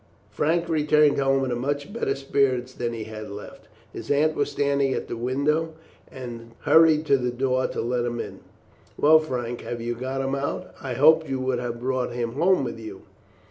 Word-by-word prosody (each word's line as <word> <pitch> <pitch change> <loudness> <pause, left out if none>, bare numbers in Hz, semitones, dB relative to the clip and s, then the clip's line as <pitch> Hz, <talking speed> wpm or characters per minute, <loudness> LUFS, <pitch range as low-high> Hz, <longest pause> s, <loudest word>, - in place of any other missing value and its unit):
Frank 170 +3 0
returned 150 -2 +3
home 135 0 +2
in 125 -2 -1
much 145 +8 -3
better 235 - -1
spirits 135 -2 0
than 120 -2 -3
he 115 -2 -5
had 110 0 -8
left. 105 +1 -10 0.3
His - - -8
aunt 150 +2 +3
was - - 0
standing 140 -2 +1
at - - -4
the - - -4
window, 145 +7 0 0.3
and 120 -3 -9
hurried 160 -1 +5
to 140 -3 +3
the 125 0 -1
door 130 +1 0
to - - -4
let 120 +1 -1
him 120 0 -3
in. - - -6 0.6
"Well, 155 +2 +6
Frank, 120 -6 -4
have 120 - -5
you 120 +1 -2
got 130 +3 -3
him 135 0 -2
out? 140 +1 -3
I 130 -3 -4
hoped 160 +3 +5
you 135 -1 -1
would 130 -1 0
have 120 -1 -4
brought 130 0 -1
him 120 -1 -2
home 170 +4 +2
with 120 -2 -5
you." 110 -1 -9
130 Hz, 195 wpm, -25 LUFS, 120-145 Hz, 0.6 s, Well